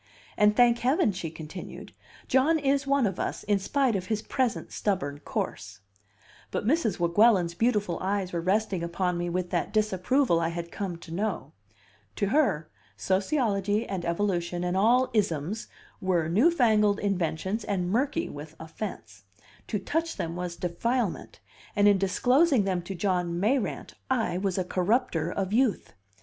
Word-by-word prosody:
"And, 210 0 +4
thank 240 0 +5
Heaven!" 255 -3 +2
she 180 -3 -5
continued, 160 +3 -9 0.3
"John 275 +6 +3
is 275 -1 +1
one 275 -2 +3
of 190 -3 -2
us, - - -3
in 205 -1 +1
spite 255 +4 +1
of 185 -1 -3
his 215 0 -1
present 255 -2 -1
stubborn 160 -9 -2
course." 100 -8 -5 0.7
But - - -3
Mrs. 275 -3 +1
Weguelin's 175 0 +4
beautiful 210 -3 0
eyes 190 -1 -1
were 170 - -1
resting 190 0 0
upon 175 +1 -1
me 175 0 -2
with 180 0 -2
that - - -1
disapproval 215 0 +2
I 165 0 0
had 170 0 -5
come 190 -4 -4
to 165 -1 -10
know. 210 +5 -2 0.6
To 200 -2 0
her, 225 - +2 0.3
sociology 205 0 0
and 190 -3 -4
evolution 175 -1 -1
and 180 0 -1
all 240 +6 +3
"isms" 195 0 -1 0.3
were 175 -4 +1
new 215 - +4
fangled 215 -10 +3
inventions 190 +2 -1
and 180 -3 -1
murky 285 - 0
with 150 +2 -9
offense; 160 - -8 0.4
to 210 - -1
touch 325 - -2
them 165 0 -3
was 180 -1 -4
defilement, 215 +6 -2 0.4
and 205 0 +4
in 200 -2 +5
disclosing 250 - +3
them 185 -2 -1
to 190 +3 -6
John 180 -2 -1
Mayrant 210 - -1 0.2
I 225 -8 0
was 195 -1 -1
a 185 - +1
corrupter 180 -2 0
of 195 +1 -2
youth. 240 -2 +1
195 Hz, 155 wpm, -27 LUFS, 175-230 Hz, 0.7 s, thank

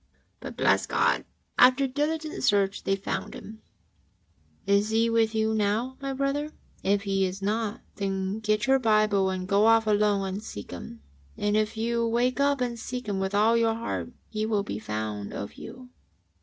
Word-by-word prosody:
But, - - -8
bless - - +3
God, - - +1 0.3
after 255 +2 +6
diligent 305 +4 -2
search 200 -1 +2
they 195 - +2
found 195 - -4
Him! 220 +1 -10 1.0
Is 200 +2 +2
He 225 +1 +2
with 225 -1 +2
you 220 0 +1
now, 220 +5 0
my 275 0 -3
brother? 275 +3 -1 0.3
If 200 +1 +1
He 195 -2 +1
is 190 +1 -3
not, 215 +1 -1 0.2
then 195 +1 -2
get 215 -1 0
your 270 0 +4
Bible 215 -4 +3
and 185 -1 -3
go 200 +3 +4
off 225 0 +5
alone 205 -2 +2
and 195 +3 -5
seek 100 - -8
Him, 80 -4 -9 0.3
and 205 0 0
if 215 +1 0
you 235 +1 0
wake 245 +3 +1
up 280 -1 +2
and 240 -2 -2
seek 250 +1 -5
Him 200 -2 -1
with 190 +1 -1
all 220 +3 +4
your 230 -1 +2
heart, 230 +1 -4 0.2
He 215 -1 -3
will 215 -2 0
be 105 - -5
found 105 -1 -4
of 100 - -6
you. 250 -1 -11
215 Hz, 180 wpm, -27 LUFS, 200-235 Hz, 1.0 s, after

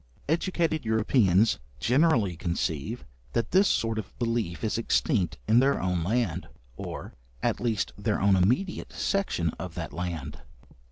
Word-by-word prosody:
Educated 165 -1 0
Europeans 110 -2 +3 0.2
generally 125 - +3
conceive 85 - -2 0.3
that 115 - 0
this 190 +3 +5
sort 115 -1 +1
of 105 - -8
belief 115 -7 -1
is 110 +1 0
extinct 95 - +1
in 110 +3 +6
their 135 +2 +3
own 90 -2 0
land, 110 -1 0 0.3
or, - - -7 0.3
at - - +1
least 115 -5 -1
their 105 +1 0
own 100 0 +4
immediate 125 - +1
section 190 - 0
of 90 -2 -6
that - - -5
land. 80 -4 -4
110 Hz, 135 wpm, -27 LUFS, 90-125 Hz, 0.3 s, in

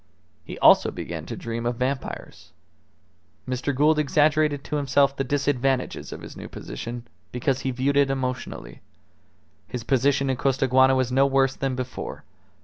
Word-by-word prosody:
He - - -8
also - - +6
began - - -6
to - - -5
dream 115 0 -4
of 120 - -1
vampires. 130 +2 -4 0.9
Mr. 130 +2 -2
Gould 150 +3 +3
exaggerated 150 0 +2
to 150 - -3
himself 140 0 +2
the 135 - -1
disadvantages 135 -1 -1
of - - -7
his - - -10
new - - -8
position, 115 - -7 0.2
because 130 +2 0
he 135 - -2
viewed 130 +3 0
it 140 -1 +4
emotionally. 125 - -4 0.9
His 125 -2 -5
position 135 +2 +2
in 130 - -2
Costaguana 130 0 +3
was 130 -1 0
no 135 +2 +4
worse 135 -1 +2
than 135 -1 -2
before. 130 0 -6
135 Hz, 150 wpm, -24 LUFS, 125-140 Hz, 0.9 s, also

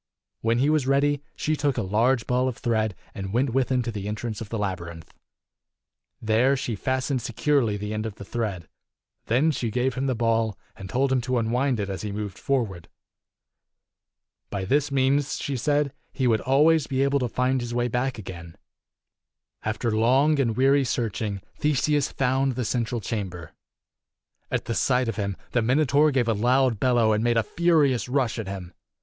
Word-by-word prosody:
When 115 +1 +1
he 140 +5 +3
was 150 -4 +1
ready, 140 +1 +2
she 155 - 0
took 140 -3 0
a 115 - 0
large 115 +5 +2
ball 125 +1 +1
of 125 - -3
thread 110 -5 0 0.2
and 95 -1 -5
went 125 +4 +1
with 130 +1 0
him 125 -1 +2
to 120 - -3
the 100 -2 -5
entrance 110 +1 -4
of 110 - -7
the 115 - -3
labyrinth. 85 -5 -5 1.1
There 115 +5 +2
she 120 -3 -3
fastened 130 +4 -1
securely 120 -3 +1
the 105 +1 -4
end 110 +1 -2
of 105 - -7
the 100 - -10
thread. 100 -8 -3 0.6
Then 135 +8 +3
she 120 -5 -2
gave 125 +3 0
him 135 +2 -2
the 130 - 0
ball, 115 -2 +1 0.2
and 95 -1 -9
told 135 +4 +1
him 130 -1 +2
to 125 +1 -1
unwind 120 +2 +1
it 100 - -2
as 95 -1 -4
he 105 - -4
moved 100 -2 -5
forward. 110 - -2 1.6
By 100 -2 -3
this 145 +6 +1
means, 135 +1 +1
she 140 - -3
said, 145 +2 +1 0.2
he 130 - -2
would 115 -3 +3
always 150 +3 +3
be 135 -1 +1
able 140 0 +2
to 125 -2 -1
find 125 +2 0
his 120 0 -5
way. 120 0 0
back 125 +2 -1
again. 85 -5 -9 1.1
After 110 +1 -1
long 135 +7 +3
and 115 -4 +1
weary 135 +2 +4
searching, 110 -5 -2 0.2
Theseus 150 -1 +1
found 135 0 +1
the 125 -1 -2
central 120 0 -1
chamber. 90 -6 -5 1.0
At - - -2
sight 125 -1 +2
of 115 -2 -3
him, 100 -2 -2
the 120 - +2
Minotaur 145 +5 +3
gave 130 -4 +1
a 115 - +3
loud 125 +1 +2
bellow 120 -3 +3
and 105 +1 0
made 120 -1 +2
a 115 - +3
furious 150 -8 +2
rush 125 -3 0
at 110 - -4
him. 95 -2 -7
120 Hz, 185 wpm, -25 LUFS, 110-135 Hz, 1.6 s, weary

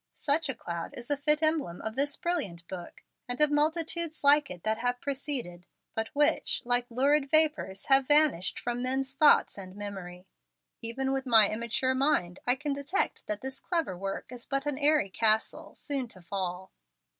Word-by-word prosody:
Such 300 +1 0
a 265 - -2
cloud 170 -6 -6
is 240 +3 -7
a - - +3
fit 300 +2 +1
emblem 310 - 0
of 220 - -3
this 285 +2 0
brilliant 200 - -3
book, 180 -2 -9 0.2
and 245 0 -4
of 300 -1 +4
multitudes 320 +1 0
like 290 +1 +5
it 180 -2 -9
that 220 +1 -1
have 245 +1 -1
preceded, 260 - -4 0.3
but 220 0 -2
which, 295 +2 +2
like 245 0 +1
lurid 275 +4 +2
vapors, 305 -11 +1
have 270 -1 +4
vanished 295 - +3
from 240 0 -3
men's 265 +1 -1
thought 295 +2 +4
and 185 -1 -10
memory. 190 -3 -7 0.6
Even 265 +4 -2
with 270 0 -2
my 220 -4 +6
immature 235 +4 -1
mind 260 -10 +1
I 245 - +5
can 290 +1 -3
detect 280 +7 -2
that 210 0 -2
this 265 0 -6
clever 330 - -2
work 195 +5 -5
is 245 -1 -8
but 275 +1 -1
an 290 -2 -2
airy 295 -9 +3
castle, 220 +2 0
soon 275 -4 -3
to 185 -5 -12
fall. 185 0 -4
260 Hz, 180 wpm, -29 LUFS, 205-295 Hz, 0.6 s, my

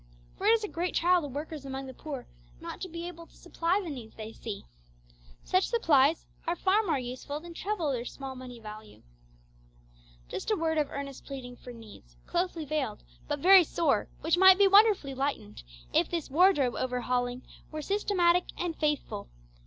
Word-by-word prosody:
For 400 - -2
it 445 - +7
is 455 -1 +2
a - - -1
great 350 -1 -3
trial 355 +1 +4
to 295 - -4
workers 295 +2 -6
among 270 0 -5
the 260 - -8
poor 280 -2 -7 0.3
not - - -8
to 370 - -4
be 335 +1 -6
able 335 -1 -9
to - - -22
supply 340 +4 0
the 335 - -5
needs 235 -5 -9
they 220 0 -8
see. 220 -3 -7 0.8
Such 370 +1 +2
supplies 320 - +3 0.2
are 340 - +1
far 385 +4 +3
more 335 -9 0
useful 260 +3 -5
than 340 +2 -10
treble 350 -5 -2
their 245 -3 -2
small 265 +1 -7
money 250 -2 -9
value. 215 -1 -11 1.2
Just 190 - -5
a 430 - +3
word 320 -3 0
of 295 - 0
earnest 280 -1 -7
pleading 255 -3 -7
for 245 - -11
needs, 210 - -14
closely 345 -3 -1
veiled, 270 -8 -2 0.2
but 290 -1 -2
very 375 +1 +8
sore, 335 +1 0
which 330 +2 +2
might 380 0 +9
be 400 0 +6
wonderfully 395 -8 +5
lightened 265 - -3 0.3
if - - +3
this 335 -5 -3
wardrobe 295 -6 +4
over 250 -1 -2
hauling 245 0 -1 0.3
were 310 -1 -5
systematic 360 -3 +2
and 345 -2 -2
faithful. 295 - -2
300 Hz, 185 wpm, -29 LUFS, 255-355 Hz, 1.2 s, might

